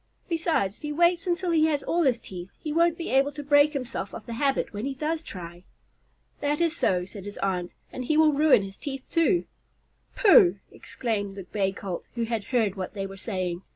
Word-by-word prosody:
Besides, 325 - 0
if - - -30
he 300 - -4
waits 345 +3 +2
until 350 0 0
he 315 -1 +4
has 295 -3 0
all 345 - +1
his 260 -6 +3
teeth, 180 -4 -9
he 305 - -5
won't 335 0 +3
be 335 - -4
able 270 +2 +3
to 295 0 -6
break 290 +1 +5
himself 250 -7 -4
of 220 - -9
the 235 - -6
habit 270 +1 0
when 205 +1 -4
he 270 +1 -3
does 310 +3 -2
try." 175 - -9 0.8
"That 295 +1 0
is 335 -1 +1
so," 180 - +1
said 195 +1 -10
his 205 - -7
aunt, 180 -2 -2 0.2
"and 255 - -5
he 305 +4 +1
will 310 -1 +5
ruin 290 -7 +5
his 195 0 -8
teeth, 270 -2 -6
too." 340 +2 +2 0.7
"Pooh!" 200 - +6
exclaimed 205 -5 -4
the 195 - -7
Bay 195 +1 -1
Colt, 190 -2 -5
who 235 - -1
had 225 -3 -2
heard 225 -6 +1
what 190 +1 -6
they 195 -1 -3
were 195 0 -8
saying. 185 -4 -3
255 Hz, 215 wpm, -26 LUFS, 195-310 Hz, 0.8 s, Pooh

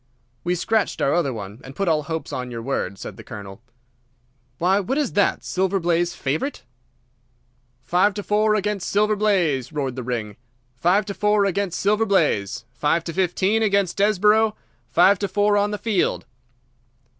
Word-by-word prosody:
"We 175 +1 0
scratched 220 +4 0
our 140 - +2
other 170 -6 +1
one, 105 -1 -8
and 135 +1 -11
put 195 - -1
all 155 -2 +2
hopes 160 +2 -5
on 125 -1 -4
your 115 -2 -6
word," 100 -7 -2
said - - -8
the - - -10
Colonel. 100 0 -9 1.0
"Why, 185 +3 +2
what 230 +8 -2
is 295 -5 -1
that? 200 -1 +1
Silver 190 +1 0
Blaze 175 0 0
favourite?" 155 - -3 1.2
"Five 180 +8 +2
to 205 - -4
four 215 +1 +2
against 205 -2 -2
Silver 210 +1 +2
Blaze!" 175 - +1
roared 140 -4 -3
the 130 - -4
ring. 115 -4 -4 0.4
"Five 180 +10 +2
to 200 - -4
four 210 0 +2
against 195 -2 -1
Silver 210 +3 +2
Blaze! 120 - +1
Five 150 +6 +1
to 165 - -5
fifteen 190 +4 +1
against 200 -4 +1
Desborough! 210 +2 +3 0.3
Five 185 +3 +4
to 200 - -1
four 205 +2 +2
on 205 0 +2
the 210 - -3
field!" 205 -2 0
185 Hz, 170 wpm, -22 LUFS, 140-205 Hz, 1.2 s, Five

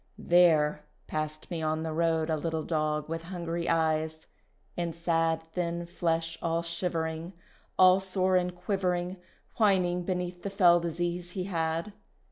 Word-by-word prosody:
There 155 -4 +4 0.2
passed 155 +1 -4
me 165 -2 -2
on 155 0 -1
the 160 -1 -3
road 165 0 +1
A - - +2
little 160 +1 -2
dog 155 -2 -1
with 165 +1 -3
hungry 170 -1 -4
eyes, 160 -1 0 0.5
and 170 -2 -2
sad 165 -1 +1
Thin 170 -1 -2
flesh 165 -1 -1
all 165 0 0
shivering, 170 0 -3 0.4
All 185 0 +7
sore 185 -1 +1
and 180 -1 +1
quivering, 180 -1 -1 0.4
Whining 185 -5 +3
beneath 180 0 -3
the 200 - -3
fell 180 -3 +5
disease 175 +1 -3
he 185 - -2
had. 165 +1 -2
170 Hz, 140 wpm, -29 LUFS, 160-180 Hz, 0.5 s, All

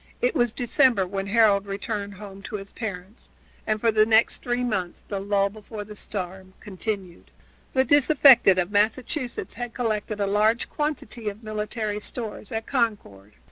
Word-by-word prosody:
It - - +1
was 240 -2 +2
December 245 -4 +2
when 195 +1 -4
Harold 205 -2 +4
returned 200 0 -4
home 195 0 -10
to - - -5
his 195 -1 -7
parents, 200 -1 -7 0.4
and 215 0 +1
for 230 +1 +3
the 215 0 +5
next 225 0 +3
three 245 0 -1
months 190 -7 -3
the 200 - -3
lull 200 0 +1
before 215 0 -8
the 210 +1 -11
storm 190 -2 -6
continued. 195 -3 -5 0.4
The 260 - +4
disaffected 270 -8 +6
of 180 +1 0
Massachusetts 240 +6 -1
had 245 -1 -6
collected 215 -3 -2
a 200 - +1
large 215 +3 +2
quantity 265 -7 -2
of 205 +3 -11
military 215 0 -3
stores 215 -1 -7
at 225 0 -3
Concord. 205 - -2
215 Hz, 160 wpm, -25 LUFS, 200-235 Hz, 0.4 s, disaffected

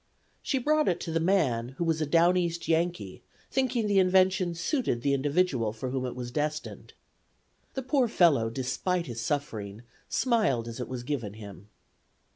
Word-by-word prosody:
She 270 - -1
brought 305 +4 +2
it 175 - +1
to 165 - -4
the 165 - +1
man, 135 -9 +1
who - - -1
was 165 -1 0
a 155 - 0
down 170 +3 +4
East 170 -2 -1
Yankee, 165 - -1 0.3
thinking 255 -4 0
the 200 -2 +3
invention 185 -1 +3
suited 170 - -1
the 140 - +2
individual 140 -5 +1
for 125 +3 -5
whom 130 -1 -2
it 125 - -6
was 120 -1 -6
destined. 150 +2 -4 0.8
The 265 - -3
poor 255 0 +2
fellow, 155 - +3
despite 135 +9 -2
his 120 -2 -5
suffering, 110 -5 -3 0.3
smiled 210 - +1
as 115 +1 -7
it 125 - -4
was 125 -2 -5
given 120 -7 -3
him. 100 -2 -11
155 Hz, 170 wpm, -28 LUFS, 120-185 Hz, 0.8 s, down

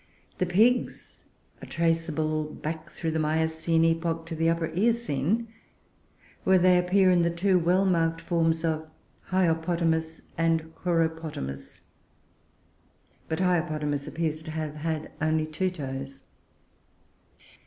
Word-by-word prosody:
The 185 - +1
Pigs 225 +8 +1 0.4
are - - -9
traceable 160 -2 0
back 155 +1 -6
through 165 0 -3
the 160 - -1
Miocene 160 +1 +1
epoch 165 0 0
to 165 0 -5
the 165 +1 +2
Upper 165 -1 -1
Eocene, 225 - +1 1.0
where 190 0 +5
they 180 0 +5
appear 185 +1 +4
in 175 -1 +4
the 170 - +2
two 180 +2 +2
well 180 +3 +2
marked 165 -3 +1
forms 165 -1 0
of 160 -1 -2 0.4
Hyopopotamus 165 -2 +1 0.2
and 165 -1 +1
Choeropotamus; 160 - -3 1.5
but 160 +3 -1
Hyopotamus 155 -5 0
appears 155 -1 -2
to 160 - -9
have 155 -1 -3
had 155 0 -3
only 155 0 +1
two 155 +4 -1
toes. 135 -4 -7
165 Hz, 120 wpm, -27 LUFS, 155-175 Hz, 1.5 s, where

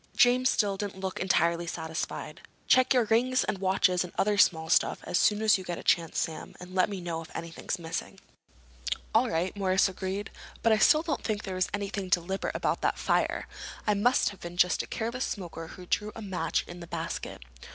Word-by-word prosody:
James 250 +1 +5
still 200 -2 +1
didn't 200 -1 -5
look 190 -1 -4
entirely 170 -2 +1
satisfied. 160 -1 -5 0.2
"Check 255 0 +4
your 250 -3 +5
rings 245 +4 +2
and 195 - -2
watches 185 -1 +2
and 180 - -8
other 210 +1 +2
small 160 -5 +4
stuff 160 - +2
as 175 - 0
soon 210 +1 +3
as 215 -3 +5
you - - -7
get 175 -2 -4
a - - -8
chance, 165 -2 +2
Sam, 160 - -3
and 180 +1 -10
let 185 +1 +3
me 200 -2 -4
know 170 -2 -4
if 165 - -11
anything's 165 0 -4
missing." 165 -1 -5 0.9
"All - - +4
right," 170 +4 -1
Morris 190 -1 +3
agreed. 190 +1 -4 0.3
"But 230 - +4
I 215 - +4
still 305 +8 +5
don't 320 -4 -2
think 215 -1 -2
there 190 - -4
was 185 0 0
anything 200 -1 -3
deliberate 180 +2 0
about - - 0
that - - +1
fire. - - 0 0.4
It 210 - +4
must 210 +3 +3
have 200 - -11
been 175 0 -8
just 180 0 +3
a - - -8
careless 235 +3 -3
smoker 170 -4 -6
who 180 +2 -11
threw 210 +4 -1
a 225 - -7
match 190 -3 -1
in 175 0 -9
the 170 - -9
basket." 60 - -5
190 Hz, 205 wpm, -29 LUFS, 175-210 Hz, 0.9 s, James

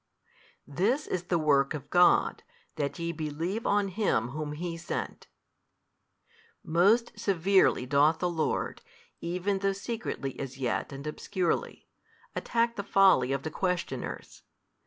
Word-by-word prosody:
This 215 - 0
is 180 -1 -3
the 175 - +1
work 145 -2 +2
of 140 -2 -9
God, 180 0 +4 0.3
that 145 -3 -2
ye 170 0 -2
believe 165 +7 -3
on 205 -1 +2
Him 180 - 0
whom 150 +2 -4
HE 165 +2 -4
sent. 165 - -5 1.4
Most 210 +7 +2
severely 190 -7 +3
doth 145 +4 +3
the 180 - 0
Lord, 165 -3 -2 0.4
even 180 +3 -1
though 195 0 +1
secretly 200 - -5
as 135 -1 -6
yet 130 +1 -2
and 140 +1 -8
obscurely, 175 +3 -2 0.5
attack 235 0 0
the 200 - -2
folly 190 -11 +4
of 135 0 -1
the 155 - -4
questioners. 180 +1 -3
170 Hz, 130 wpm, -29 LUFS, 150-195 Hz, 1.4 s, God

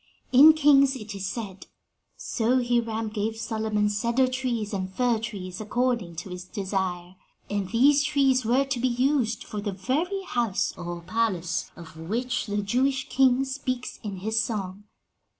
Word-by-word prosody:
"In 290 +5 +9
Kings 280 -3 +5
it 215 -4 -7
is 195 -1 -4
said, 195 -2 -6 0.5
'So 245 +2 0
Hiram 230 -2 0
gave 215 +1 -3
Solomon 220 -2 -1
cedar 235 +5 +1
trees 250 -5 -2
and 190 -1 -3
fir 240 +2 +1
trees, 195 -4 -6
according 230 -5 -1
to 175 +3 -7
his 180 0 -6
desire,' 185 -2 -3 0.3
and 200 -2 -2
these 280 +6 +4
trees 270 -3 +2
were 250 +5 +2
to 270 -2 -2
be 255 - +2
used 250 -2 +1
for 210 - -6
the 205 -1 -3
very 315 - -1
house, 235 - -1
or 175 -1 -6
palace, 185 -3 -1
of 165 -2 -12
which 230 +11 -2
the 205 0 -1
Jewish 265 +6 0
king 265 0 +3
speaks 260 -2 -4
in 205 -4 -5
his 220 +2 +1
Song. 200 -3 -4
225 Hz, 155 wpm, -26 LUFS, 195-255 Hz, 0.5 s, In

